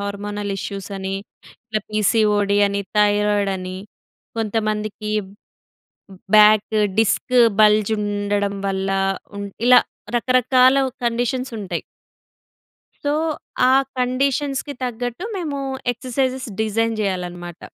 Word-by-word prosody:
Hormonal 200 0 -4
issues 195 0 -6
అని, 190 0 -4 0.7
PCOD 210 -1 +2
అని, 200 0 -1 0.2
thyroid 205 -1 +3
అని, 185 0 -6 0.6
కొంతమందికి 215 -1 -2 1.2
బ్యాక్ 215 0 +6 0.2
డిస్క్ 225 +4 +1 0.3
బల్జ్ 210 0 +4
ఉండడం 205 -1 -1
వల్ల, 195 0 -1 0.5
ఉం 200 0 -4 0.2
ఇలా 250 0 +9 0.4
రకరకాల 255 +2 +4 0.3
కండిషన్స్ 245 +2 -1
ఉంటాయి. 195 -3 -4 1.2
సో, 290 - +1 0.6
ఆ - - +5 0.3
కండీషన్స్‌కి 270 +3 0
తగ్గట్టు 245 - -4
మేము 310 -6 -3 0.3
ఎక్సర్‌సైజెస్ 255 +1 -2
డిజైన్ 225 +1 0
జేయాలన్నమాట. 175 -3 -4
215 Hz, 90 wpm, -21 LUFS, 200-250 Hz, 1.2 s, ఇలా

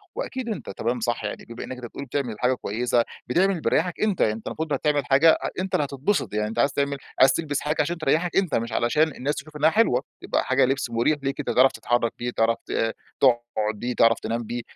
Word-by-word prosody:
وأكيد 255 -2 -4
أنتَ 190 - -5
تمام 120 +5 -2
صح 120 0 -2
يعني. 105 - -5
بما 115 +1 -8
إنَّك 130 - -7
أنتَ 125 - -8
بتقل 140 +4 -7
بتعمل 125 -3 -3
حاجة 125 +1 +2
كويِسة، 120 0 0 0.2
بتعمل 180 +10 +3
اللي 175 -4 -3
بيريِّحَك 175 +3 0
أنتَ. 210 -4 +1
يعني، 105 - +3
أنتَ 110 0 -8
المفروض 155 -1 -3
هتعمل 145 0 +1
حاجة 140 +5 +5 0.2
أنتَ 185 0 -1
اللي 145 - +2
هتتبسط، 140 - -1
يعني 105 0 0
أنتَ 110 - -4
عايِز 140 - +3
تعمل 140 0 0 0.2
عايِز 130 +1 +7
تلبَس 145 -2 -1
حاجة 150 +1 -1
عشان 175 +1 -2
تريِّحَك 165 +3 0
أنتَ، 190 -5 +2
مش 115 +1 -1
علشان 120 +6 +2
الناس 145 +4 -2
تشوف 150 +1 -8
إنها 150 +2 +4
حلوة. 215 - +2 0.2
يبقى - - 0
حاجة 130 +1 +3
لِبس 135 -1 -1
مريح 120 +6 +1
ليك 135 +1 -2
أنتَ، 145 - -3
تعرف 130 +1 +5
تتحرَّك 120 -2 0
بيه، 120 0 -2
تعرف 115 0 +1
ت 115 0 0 0.3
تقعد 120 -4 +2
بيه، 120 +2 -3
تعرف 115 0 +4
تنام 115 +2 -3
بيه. 120 +2 -4
135 Hz, 230 wpm, -24 LUFS, 120-155 Hz, 0.3 s, عايِز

